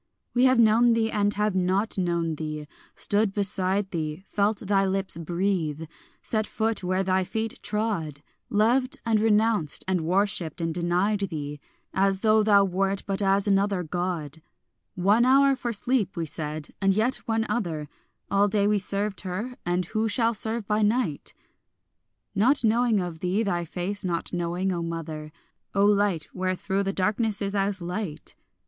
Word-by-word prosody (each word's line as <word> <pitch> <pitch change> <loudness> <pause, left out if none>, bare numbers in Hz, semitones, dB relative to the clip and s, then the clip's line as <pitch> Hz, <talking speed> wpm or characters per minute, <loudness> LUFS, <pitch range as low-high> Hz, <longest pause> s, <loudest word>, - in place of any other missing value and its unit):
We 250 +1 +4
have 255 -1 +5
known 230 +1 +5
thee 225 -1 +1
and 205 -1 +1
have 210 0 +1
not 190 +4 +1
known 170 -3 0
thee; 155 -1 -5 0.3
stood 205 -1 +1
beside 195 -1 +1
thee, 155 0 -4
Felt 205 +2 0
thy 195 -2 +2
lips 195 -1 -1
breathe, 170 -2 -1 0.4
set 215 -2 0
foot 220 -2 -1
where 185 +1 0
thy 190 0 +1
feet 220 +4 -4
trod, 190 -10 -2 0.3
Loved 240 +5 +2
and 225 -2 +2
renounced 215 -7 +2
and 185 -2 +1
worshipped 185 0 +1
and 165 -1 -1
denied 180 +5 +1
thee, 150 -3 -5 0.3
As 195 0 +1
though 215 0 +4
thou 205 -2 +5
wert 195 +1 -1
but 195 +1 -1
as 195 +1 +2
another 195 -2 +2
God, 165 -3 -4 0.5
"One 200 +6 +3
hour 275 +2 +5
for 240 -2 -3
sleep," 215 -4 -1
we 165 - -1
said, 155 -1 -6
"and 195 -1 +3
yet 230 +5 +1
one 225 0 +1
other; 165 -10 -2 0.4
All 200 +1 +4
day 200 0 +1
we 210 0 +2
served 200 +1 -2
her, 200 +7 -4
and 175 +1 0
who 220 +4 -1
shall 230 +2 +2
serve 220 0 -1
by 210 +1 0
night?" 210 - 0 1.0
Not 250 +7 +3
knowing 230 -1 +3
of 175 -3 -4
thee, 185 +6 0
thy 175 -4 -1
face 185 +5 -4
not 175 -2 -2
knowing, 175 +2 -1
O 170 - -2
mother, 160 -2 -5 0.4
O 200 0 +4
light 205 -6 +2
wherethrough 185 +1 -1
the 195 0 -1
darkness 210 +2 0
is 200 -1 -3
as 195 -2 -1
light. 180 -2 -5
195 Hz, 160 wpm, -26 LUFS, 175-215 Hz, 1.0 s, have